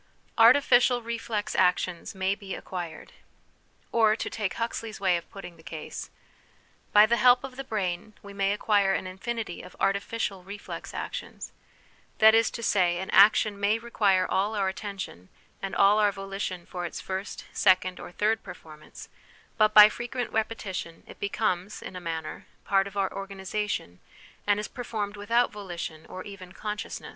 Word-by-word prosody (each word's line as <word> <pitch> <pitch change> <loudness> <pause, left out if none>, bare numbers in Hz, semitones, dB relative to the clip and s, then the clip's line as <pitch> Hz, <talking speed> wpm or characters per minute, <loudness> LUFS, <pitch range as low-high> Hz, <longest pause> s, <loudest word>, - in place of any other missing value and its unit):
Artificial 245 0 +6
Reflex 225 -2 -3
Actions 180 0 +1
may 190 +1 +1
be 200 -1 -7
Acquired. 175 -3 -7 0.8
Or, 220 -2 +4
to - - -4
take 210 -4 -2
Huxley's 230 -1 -4
way 190 -2 +3
of 170 - -5
putting 180 -3 -10
the - - -16
case: 160 -1 -7 0.8
"By 210 +1 +8
the 235 +2 +2
help 245 +2 +5
of 265 -1 -7
the 270 - -5
brain 210 -4 -3
we 200 0 -10
may 195 0 +1
acquire 205 -2 +2
an - - -3
infinity 195 +1 -5
of 180 - -13
artificial 200 0 -1
reflex 200 +2 -8
actions; - - -6 0.7
that 220 0 +7
is 225 0 +4
to 230 - -7
say, 180 -5 +2
an 190 +2 -5
action 205 0 +5
may 205 +2 +2
require 205 -5 +2
all 205 +3 0
our 195 -2 +1
attention 190 - -7 0.3
and 195 - -4
all 200 +2 +5
our 205 -1 +4
volition 195 -2 -5
for 180 -2 -6
its 175 - -5
first, 190 +1 -5
second, 185 -1 +3
or - - -9
third 215 +4 +1
performance, 155 -1 -12 0.5
but 215 -1 +4
by 210 0 +12
frequent 240 +3 -4
repetition 205 -6 -3
it - - -13
becomes, 200 -2 -1
in - - -9
a 180 - -6
manner, 165 -2 -5 0.2
part 195 -1 +2
of 200 0 -9
our 195 -1 0
organ 195 0 -7
isation, 190 - -3 0.5
and 205 0 +3
is 210 - -3
performed 215 -4 -4
without 230 +4 +1
volition 175 -6 -7
or 185 - -7
even 190 -3 -10
consciousness. 210 +1 -5
200 Hz, 165 wpm, -27 LUFS, 185-215 Hz, 0.8 s, by